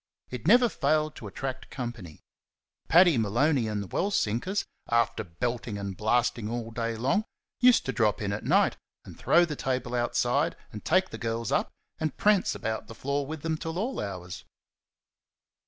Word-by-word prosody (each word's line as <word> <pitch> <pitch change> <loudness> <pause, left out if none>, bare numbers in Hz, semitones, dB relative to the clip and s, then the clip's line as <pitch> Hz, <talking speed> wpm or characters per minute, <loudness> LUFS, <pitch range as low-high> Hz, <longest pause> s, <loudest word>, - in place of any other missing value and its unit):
It 125 +2 -5
never 240 +4 +7
failed 155 -4 0
to 110 - -8
attract 130 +6 -5
company. 115 - -7 0.7
Paddy 170 -5 +6
Maloney 120 +4 +2
and 105 -1 -2
the - - -9
well 190 - 0
sinkers, 185 - 0 0.2
after 115 -1 +1
belting 115 +5 -3
and 100 -1 -5
blasting 120 +1 +1
all 115 -1 -4
day 115 0 -2
long, 135 - +1 0.4
used 250 -1 +5
to 135 - -1
drop 110 -5 +1
in 100 -1 -2
at 105 - -4
night, - - +3 0.3
and - - -11
throw 175 +1 +4
the 155 -3 -5
table 130 -3 -2
outside, 125 +5 +1 0.2
and 105 - -8
take 185 +3 +2
the 110 - -7
girls 115 -1 -2
up, - - +1 0.3
and 155 -1 -2
prance 205 -3 +3
about 110 -1 -3
the 115 - -10
floor 140 +2 -2
with 155 0 -6
them 160 -1 -1
till 160 +1 -5
all 235 +8 -2
hours. 90 -3 -6
120 Hz, 170 wpm, -28 LUFS, 110-155 Hz, 0.7 s, never